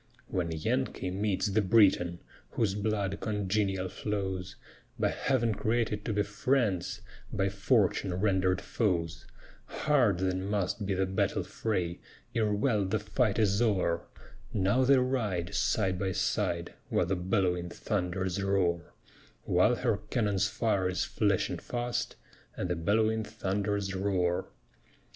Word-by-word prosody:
When 85 -3 -1
Yankee 80 +3 -1
meets 100 +1 0
the 105 +1 +2
Briton, 95 -5 +4 0.3
Whose 105 -4 +1
blood 100 -1 -1
congenial 100 -2 0
flows, 95 -2 -3 0.4
By - - +2
Heav'n 125 -4 +1
created 110 -1 0
to 110 - -1
be 105 0 +2
friends, 105 -3 0 0.3
By 95 0 +1
fortune 100 -2 +1
rendered 95 -1 +1
foes; 85 -7 -1 0.4
Hard 125 -11 +2
then 95 +1 -1
must 100 0 -1
be 100 - 0
the 95 +1 +1
battle 95 +1 0
fray, 90 -6 -2 0.3
Ere 110 -2 +1
well 105 0 +2
the 95 +3 0
fight 105 0 0
is 105 -1 +2
o'er; 95 -7 +2 0.5
Now 105 +6 +2
they 135 +1 +5
ride, 110 -10 0
side 95 -1 +1
by 95 -1 -1
side, 85 0 -1 0.2
While - - +2
the 95 +3 0
bell'wing 90 -1 0
thunders 95 0 -2
roar, 90 -4 0 0.5
While 95 +7 +3
her 115 -4 0
cannon's 100 -5 +1
fire 105 -3 0
is 90 - 0
flashing - - 0
fast, 120 0 -3 0.4
And 90 - -2
the - - +1
bell'wing 110 +6 +1
thunders 100 -1 -2
roar. 95 -2 0
100 Hz, 130 wpm, -30 LUFS, 95-110 Hz, 0.5 s, they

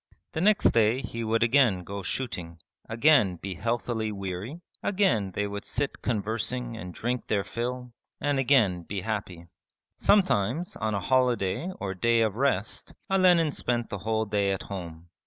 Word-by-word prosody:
The 160 - -3
next 210 +2 +5
day 115 +2 +3
he 115 -3 -5
would 115 +1 +2
again 115 -7 +3
go 100 +3 -6
shooting, 90 -6 -3 0.3
again 115 - +4
be 95 +3 -6
healthily 115 +2 -2
weary, 100 - -5 0.2
again 130 - +1
they 105 +2 -2
would 100 0 -5
sit 145 - -2
conversing 115 +2 -2
and 90 -5 -7
drink 120 +7 -3
their 100 -2 +1
fill, 125 +2 -4 0.3
and 145 -1 0
again 120 -10 +3
be 95 +3 -5
happy. 95 -5 -4 0.5
Sometimes 175 - +2
on 110 -1 -2
a - - 0
holiday 125 - +1
or 95 -1 -3
day 115 +5 +2
of 110 -3 +1
rest 115 -6 -1 0.2
Olenin 180 -5 +4
spent 120 -3 -1
the 100 - -4
whole 110 +2 0
day 100 -1 +1
at 95 - -3
home. 85 -3 -8
110 Hz, 155 wpm, -27 LUFS, 100-125 Hz, 0.5 s, next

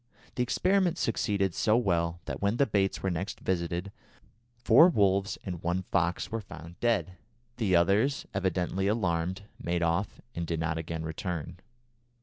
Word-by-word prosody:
The - - -2
experiment 180 +7 +2
succeeded 100 - 0
so 110 +5 +3
well 85 -6 0
that - - -5
when 100 +3 +1
the 140 - +4
baits 100 -4 0
were 95 - +1
next 90 +5 -4
visited 90 +1 -2 0.7
four 120 +9 +7
wolves 100 - +2
and 90 -4 -5
one 90 +2 -1
fox 90 -1 -1
were 115 0 -2
found 85 -3 -11
dead. 115 -6 0 0.4
The 100 -7 +2
others, 100 +11 +2
evidently 95 0 0
alarmed, 95 -3 0 0.2
made 85 0 -1
off 85 +4 0
and 85 -1 -4
did 80 -1 -2
not 80 0 -1
again 80 0 -4
return. 80 +1 -4
95 Hz, 150 wpm, -29 LUFS, 85-105 Hz, 0.7 s, four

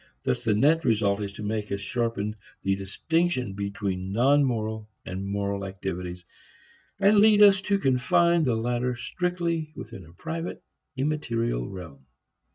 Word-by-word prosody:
Thus 65 - 0
the 110 -2 +2
net 155 +9 +4
result 105 -3 +2
is 100 -1 -3
to 105 - -8
make 105 0 -3
us 100 - -1
sharpen 105 0 -2 0.3
the 95 0 +2
distinction 125 - -1
between 100 -2 -3
non 135 +7 +4
moral 110 -4 -2 0.2
and 95 +2 -4
moral 100 0 -2
activities, 90 -2 -5 0.7
and 205 +1 +5
to - - +7
lead 210 0 +7
us 195 -1 +7
to 200 0 +1
confine 165 +4 +3
the 125 -7 +2
latter 120 +2 -1
strictly 170 +4 -2
within 110 -7 -9
a 80 0 -16
private, 165 - -5 0.3
immaterial 120 - -1
realm. 80 -8 -10
115 Hz, 150 wpm, -26 LUFS, 100-155 Hz, 0.7 s, to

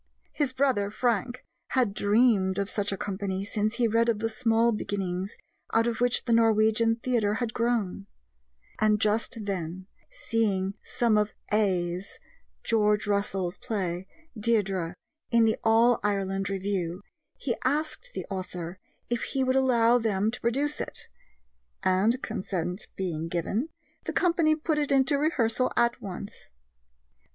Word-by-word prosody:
His 290 -4 0
brother, 260 -7 +1
Frank, 240 +2 -1 0.3
had 245 -6 +2
dreamed 205 -3 +3
of 200 0 -1
such 205 -1 0
a 195 - -2
company 195 -1 -3
since 215 +2 -1
he 240 -2 +2
read 230 +1 +2
of 225 - +2
the 225 +2 -1
small 230 0 +2
beginnings 195 -3 -3 0.4
out 230 0 +4
of 235 0 -2
which 245 0 +2
the 235 - +2
Norwegian 225 0 +4
Theatre 230 -3 0
had 225 -1 -2
grown; 225 -5 -1 0.7
and 215 -1 +3
just 215 +1 0
then, 185 -2 -4 0.3
seeing 200 -4 0
some 230 -3 +1
of 210 0 -1 0.2
"Æ's" 185 -3 0 0.5
(George 210 -1 +2
Russell's) 195 -3 -1
play, 185 -4 -3 0.3
Deirdre, 195 -6 0 0.3
in 235 -2 +4
the 220 - +1
All 230 +2 +4
Ireland 195 -1 -1
Review, 190 -2 -2 0.3
he 240 -4 -1
asked 310 - -1
the - - -3
author 180 -1 -5 0.3
if 240 - 0
he 270 -1 -1
would 260 0 +1
allow 245 -2 +4
them 215 -2 +1
to 245 - -8
produce 280 +6 0
it, - - -5 0.7
and, 205 +7 +2
consent 180 0 -3
being 165 -4 -3
given, 195 - -2 0.4
the - - -3
company 335 -3 +3
put 310 0 -1
it 290 -1 -1
into 275 +1 +3
rehearsal 255 -5 +1
at 235 0 +2
once. 195 +1 -8
215 Hz, 140 wpm, -27 LUFS, 195-235 Hz, 0.7 s, out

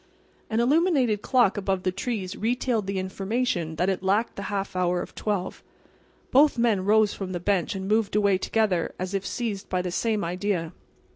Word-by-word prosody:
An 220 - 0
illuminated 260 - +2
clock 240 -6 +3
above 190 -2 -1
the 185 - +1
trees 195 -1 -3
retailed 230 -2 -1
the 195 0 -2
information 190 -2 -2
that 180 +4 0
it 190 -1 0
lacked 200 +5 +1
the - - -5
half 195 -2 -3
hour 180 -1 +1
of - - -6
twelve. 200 -3 -3 0.7
Both 285 +1 +5
men 225 -5 +2
rose 215 0 +4
from 185 -2 -5
the 175 - -2
bench 190 0 0
and 190 0 -4
moved 215 0 +1
away 200 -3 +3
together 200 -5 0
as 185 +1 -4
if 195 -1 -1
seized 210 -5 -4
by 180 -1 0
the 180 - -3
same 215 +2 0
idea. 180 -1 -2
200 Hz, 185 wpm, -26 LUFS, 185-225 Hz, 0.7 s, Both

